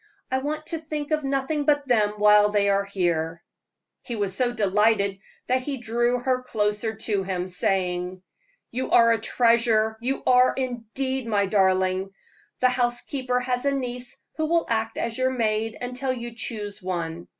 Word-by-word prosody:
I 260 Hz, -, +2 dB
want 305 Hz, +3 st, -4 dB
to 330 Hz, 0 st, -3 dB
think 305 Hz, -1 st, -5 dB
of 305 Hz, -1 st, +1 dB
nothing 275 Hz, +2 st, -1 dB
but 290 Hz, -1 st, +2 dB
them 215 Hz, -4 st, +2 dB
while 210 Hz, 0 st, +6 dB
they 205 Hz, -1 st, +2 dB
are 200 Hz, 0 st, +2 dB
here." 170 Hz, -4 st, -1 dB, 0.6 s
He 240 Hz, -, -5 dB
was 200 Hz, -3 st, -2 dB
so 245 Hz, +1 st, +1 dB
delighted 205 Hz, -2 st, +2 dB, 0.3 s
that 255 Hz, +1 st, +1 dB
he 275 Hz, +1 st, -4 dB
drew 240 Hz, +1 st, 0 dB
her 255 Hz, +1 st, 0 dB
closer 215 Hz, -2 st, -1 dB
to 210 Hz, -2 st, -1 dB
him, 185 Hz, -2 st, -2 dB
saying: 180 Hz, -2 st, -1 dB, 0.5 s
"You 255 Hz, +2 st, -3 dB
are 230 Hz, -1 st, +6 dB
a 230 Hz, -, +2 dB
treasure 225 Hz, -1 st, +2 dB
you 265 Hz, +3 st, -2 dB
are, 250 Hz, 0 st, +5 dB
indeed, 255 Hz, +1 st, -3 dB
my 205 Hz, -3 st, +2 dB
darling. 190 Hz, -1 st, +2 dB, 0.5 s
The 255 Hz, -, +5 dB
housekeeper 250 Hz, +1 st, -1 dB
has 250 Hz, 0 st, -1 dB
a 280 Hz, 0 st, +2 dB
niece 250 Hz, -2 st, -4 dB, 0.2 s
who 315 Hz, 0 st, 0 dB
will 335 Hz, +1 st, +2 dB
act 225 Hz, -1 st, -1 dB
as 230 Hz, +1 st, -2 dB
your 260 Hz, 0 st, +3 dB
maid 225 Hz, -3 st, -1 dB
until 250 Hz, +2 st, -2 dB
you 240 Hz, -2 st, -5 dB
choose 210 Hz, -3 st, -5 dB
one. 170 Hz, -2 st, -4 dB
230 Hz, 165 wpm, -25 LUFS, 200-255 Hz, 0.6 s, while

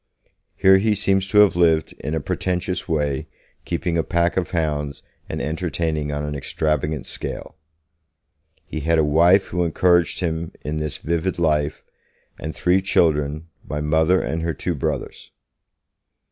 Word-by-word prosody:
Here 95 Hz, 0 st, +6 dB
he 105 Hz, +1 st, +2 dB
seems 95 Hz, -1 st, +1 dB
to 105 Hz, +1 st, +5 dB
have 105 Hz, -4 st, +4 dB
lived 80 Hz, -3 st, +3 dB
in 75 Hz, +3 st, -3 dB
a -, -, 0 dB
pretentious 90 Hz, +4 st, -2 dB
way, 75 Hz, -4 st, -1 dB, 0.4 s
keeping 85 Hz, 0 st, -1 dB
a -, -, +1 dB
pack 85 Hz, +1 st, +1 dB
of 95 Hz, -2 st, -1 dB
hounds 75 Hz, -4 st, -2 dB, 0.3 s
and -, -, -3 dB
entertaining 80 Hz, -1 st, -2 dB
on 75 Hz, 0 st, -3 dB
an 75 Hz, -, -3 dB
extravagant 75 Hz, 0 st, -1 dB
scale. -, -, -5 dB, 1.1 s
He 80 Hz, -, -5 dB
had 80 Hz, +2 st, +1 dB
a 80 Hz, -, +4 dB
wife 85 Hz, +6 st, +4 dB
who 90 Hz, 0 st, 0 dB
encouraged 85 Hz, -1 st, +2 dB
him 80 Hz, -2 st, -2 dB
in 75 Hz, +1 st, -3 dB
this 75 Hz, -1 st, -3 dB
vivid 85 Hz, +3 st, -2 dB
life, 75 Hz, -3 st, 0 dB, 0.6 s
and 80 Hz, +1 st, -5 dB
three 90 Hz, +2 st, +2 dB
children, 75 Hz, -4 st, +1 dB, 0.2 s
my 75 Hz, -, -4 dB
Mother 80 Hz, +4 st, +3 dB
and 80 Hz, -, -2 dB
her 80 Hz, -1 st, -2 dB
two 90 Hz, -, -2 dB
brothers. 75 Hz, -, -4 dB
80 Hz, 150 wpm, -22 LUFS, 75-90 Hz, 1.1 s, Here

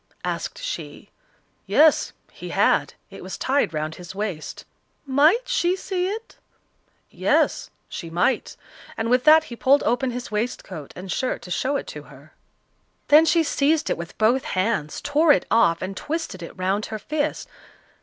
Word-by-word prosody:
asked -, -, -3 dB
she. -, -, -7 dB, 0.6 s
"Yes" 310 Hz, 0 st, +4 dB, 0.2 s
he -, -, -9 dB
had. -, -, +2 dB, 0.2 s
It -, -, -10 dB
was -, -, -7 dB
tied 275 Hz, -, +1 dB
round 155 Hz, 0 st, -3 dB
his 180 Hz, +2 st, -10 dB
waist. 195 Hz, -7 st, -5 dB, 0.4 s
"Might 305 Hz, -, +3 dB
she 370 Hz, -7 st, +1 dB
see 370 Hz, -1 st, -2 dB
it?" 445 Hz, +4 st, -6 dB, 0.7 s
"Yes" -, -, +1 dB, 0.2 s
she 165 Hz, -, -7 dB
might; 175 Hz, +10 st, 0 dB, 0.4 s
and 225 Hz, +1 st, -1 dB
with 250 Hz, +1 st, +3 dB
that 310 Hz, +1 st, +7 dB
he 240 Hz, -, -9 dB
pulled 275 Hz, +4 st, +3 dB
open 250 Hz, +3 st, +1 dB
his 245 Hz, -2 st, -6 dB
waistcoat 210 Hz, -, -4 dB
and 185 Hz, 0 st, -7 dB
shirt 255 Hz, -, -2 dB
to 180 Hz, -, -10 dB
show 265 Hz, +10 st, 0 dB
it -, -, -2 dB
to -, -, -8 dB
her. -, -, -17 dB, 0.8 s
Then 305 Hz, +2 st, +7 dB
she 330 Hz, 0 st, +3 dB
seized 310 Hz, +1 st, +1 dB
it -, -, +2 dB
with 170 Hz, 0 st, -8 dB
both 235 Hz, +4 st, +3 dB
hands, 185 Hz, -6 st, -1 dB
tore 295 Hz, +2 st, +3 dB
it -, -, 0 dB
off, 170 Hz, -8 st, +3 dB
and 190 Hz, +1 st, -5 dB
twisted 310 Hz, -, -4 dB
it 170 Hz, -, -9 dB
round 190 Hz, +3 st, -1 dB
her 220 Hz, -, -5 dB
fist. 295 Hz, +7 st, -3 dB
250 Hz, 165 wpm, -23 LUFS, 190-310 Hz, 0.8 s, that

